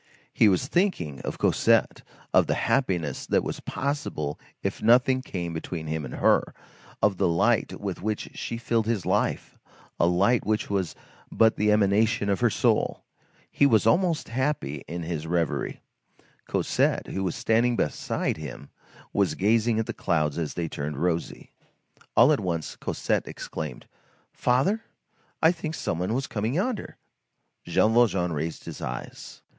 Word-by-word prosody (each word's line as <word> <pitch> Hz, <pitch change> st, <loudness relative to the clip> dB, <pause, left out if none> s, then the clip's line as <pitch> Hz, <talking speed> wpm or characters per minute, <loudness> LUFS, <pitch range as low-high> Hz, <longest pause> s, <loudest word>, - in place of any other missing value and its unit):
He 110 Hz, -, +5 dB
was 95 Hz, +6 st, +1 dB
thinking 145 Hz, -, 0 dB
of -, -, -5 dB
Cosette, -, -, +2 dB, 0.3 s
of -, -, +5 dB
the -, -, +1 dB
happiness 90 Hz, -, 0 dB
that -, -, +2 dB
was -, -, -4 dB
possible 130 Hz, -, -3 dB, 0.2 s
if -, -, -2 dB
nothing 125 Hz, +3 st, +4 dB
came 85 Hz, -8 st, -5 dB
between 80 Hz, 0 st, -5 dB
him 80 Hz, -1 st, -3 dB
and 65 Hz, -, -7 dB
her, -, -, +2 dB, 0.5 s
of 100 Hz, -3 st, +3 dB
the 95 Hz, -, +2 dB
light 85 Hz, -1 st, +1 dB
with 100 Hz, -3 st, -4 dB
which 105 Hz, +1 st, -3 dB
she 115 Hz, -, -4 dB
filled 115 Hz, -1 st, 0 dB
his 110 Hz, -6 st, -1 dB
life, -, -, -1 dB, 0.4 s
a 85 Hz, -, +4 dB
light 100 Hz, +7 st, +3 dB
which 110 Hz, -1 st, -1 dB
was 95 Hz, -4 st, -1 dB, 0.4 s
but 110 Hz, 0 st, +4 dB
the 105 Hz, 0 st, +2 dB
emanation 105 Hz, +1 st, +2 dB
of 100 Hz, -3 st, +1 dB
her -, -, +3 dB
soul. -, -, +1 dB, 0.5 s
He 140 Hz, -, +4 dB
was 110 Hz, -7 st, +3 dB
almost 170 Hz, +6 st, +2 dB
happy 130 Hz, -, -2 dB
in 85 Hz, +2 st, -5 dB
his 80 Hz, -1 st, -4 dB
reverie. 85 Hz, -1 st, -1 dB, 0.7 s
Cosette, -, -, +1 dB
who 95 Hz, -, -3 dB
was 90 Hz, -, -1 dB
standing 120 Hz, +2 st, +2 dB
beside 75 Hz, -, -1 dB
him, 75 Hz, -2 st, -8 dB, 0.4 s
was 100 Hz, -2 st, +1 dB
gazing 110 Hz, +3 st, +2 dB
at 110 Hz, -, 0 dB
the -, -, -4 dB
clouds 75 Hz, -5 st, 0 dB
as 80 Hz, -3 st, -3 dB
they 85 Hz, -1 st, -2 dB
turned 75 Hz, -1 st, -4 dB
rosy. 85 Hz, +1 st, -2 dB, 0.7 s
All 125 Hz, +6 st, +7 dB
at 145 Hz, -, +1 dB
once 85 Hz, -5 st, -3 dB
Cosette -, -, -2 dB
exclaimed: -, -, -6 dB, 0.5 s
"Father, 140 Hz, -, +1 dB, 0.6 s
I 160 Hz, -, +7 dB
should 175 Hz, -, -8 dB
think 160 Hz, 0 st, -4 dB
some 85 Hz, -, -2 dB
one 95 Hz, +6 st, -1 dB
was 135 Hz, +1 st, -1 dB
coming 110 Hz, +4 st, -2 dB
yonder." 210 Hz, +5 st, -2 dB, 0.7 s
Jean 110 Hz, -, +3 dB
Valjean 95 Hz, -7 st, +3 dB
raised 80 Hz, +2 st, -4 dB
his -, -, -8 dB
eyes. -, -, -7 dB
100 Hz, 160 wpm, -26 LUFS, 85-120 Hz, 0.7 s, All